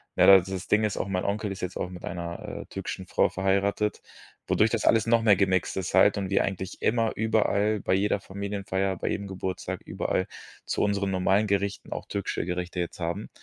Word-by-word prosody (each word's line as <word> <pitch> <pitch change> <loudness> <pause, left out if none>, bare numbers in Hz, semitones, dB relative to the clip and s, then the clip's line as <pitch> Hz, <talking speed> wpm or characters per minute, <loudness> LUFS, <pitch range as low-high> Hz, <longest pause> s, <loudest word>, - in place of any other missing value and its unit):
Na - - +5
das-das 95 0 +5
Ding 110 +1 +3
ist 105 -2 -1
auch, - - -2
mein 90 -1 -1
Onkel 105 +1 -1
ist 95 - -9
jetzt 90 0 -4
auch 90 - -3
mit 90 -1 -10
einer, 85 -1 -5
äh, - - -19
türkischen 95 -1 -6
Frau - - +2
verheiratet, 100 +2 0 0.5
wodurch 110 - +3
das 115 - 0
alles 115 0 +4
noch 115 0 +4
mehr 105 -3 +6
gemixt 95 -2 +1
ist 95 -2 -3
halt 100 +2 +5
und 95 -2 -2
wir 100 - +3
eigentlich 95 0 -4
immer, 115 -1 +1
überall, 110 -1 +1
bei - - 0
jeder 100 +2 +2
Familienfeier, 95 -1 -3
bei - - -4
jedem 100 0 -3
Geburtstag, 95 -1 -4
überall 95 - -1 0.4
zu - - -1
unseren 100 -1 0
normalen 95 +3 +2
Gerichten 100 0 -1
auch - - -6
türkische 100 -4 -3
Gerichte 90 0 -3
jetzt 85 - -5
haben. 85 +5 -3
100 Hz, 200 wpm, -27 LUFS, 95-105 Hz, 0.5 s, mehr